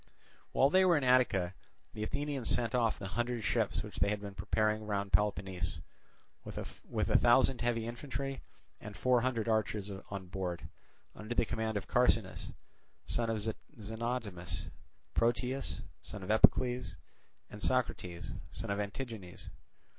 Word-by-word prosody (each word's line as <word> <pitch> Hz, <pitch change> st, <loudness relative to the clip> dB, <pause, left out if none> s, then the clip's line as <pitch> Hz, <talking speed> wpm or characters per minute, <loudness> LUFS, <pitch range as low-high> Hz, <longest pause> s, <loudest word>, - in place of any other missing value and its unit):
While 135 Hz, +2 st, +4 dB
they 190 Hz, +2 st, +6 dB
were 175 Hz, -3 st, +5 dB
in 145 Hz, -, 0 dB
Attica 125 Hz, -8 st, +4 dB, 0.4 s
the 105 Hz, -, -6 dB
Athenians 140 Hz, +2 st, -1 dB
sent 115 Hz, -2 st, +1 dB
off 115 Hz, -3 st, +2 dB
the 95 Hz, -, -6 dB
hundred 120 Hz, +2 st, -1 dB
ships -, -, +1 dB
which -, -, -9 dB
they -, -, +3 dB
had 105 Hz, 0 st, 0 dB
been 100 Hz, -1 st, -7 dB
preparing 110 Hz, +2 st, 0 dB
round 100 Hz, -1 st, -1 dB
Peloponnese, 95 Hz, -5 st, +1 dB, 0.6 s
with -, -, -8 dB
a -, -, 0 dB
thousand 120 Hz, 0 st, +5 dB
heavy 120 Hz, -2 st, +1 dB
infantry 135 Hz, +3 st, -4 dB, 0.4 s
and 105 Hz, -3 st, -8 dB
four 125 Hz, +4 st, +4 dB
hundred 120 Hz, -3 st, 0 dB
archers 110 Hz, -2 st, 0 dB, 0.2 s
on 100 Hz, -2 st, -5 dB
board, 90 Hz, -1 st, -4 dB, 0.5 s
under 110 Hz, +3 st, -5 dB
the -, -, +3 dB
command 110 Hz, -1 st, -1 dB
of 100 Hz, -, -5 dB
Carcinus, 115 Hz, -5 st, +2 dB, 0.5 s
son 115 Hz, -1 st, +1 dB
of 115 Hz, -, +1 dB, 0.4 s
Xenotimus, 110 Hz, -4 st, -3 dB, 0.4 s
Proteas, 125 Hz, +3 st, 0 dB, 0.2 s
son 105 Hz, -3 st, -7 dB
of 95 Hz, -, -1 dB
Epicles, 125 Hz, 0 st, +4 dB, 0.6 s
and 105 Hz, -, -9 dB
Socrates, 95 Hz, -9 st, -1 dB, 0.2 s
son -, -, -4 dB
of 100 Hz, -, 0 dB
Antigenes. 105 Hz, -3 st, -5 dB
110 Hz, 140 wpm, -33 LUFS, 100-125 Hz, 0.6 s, they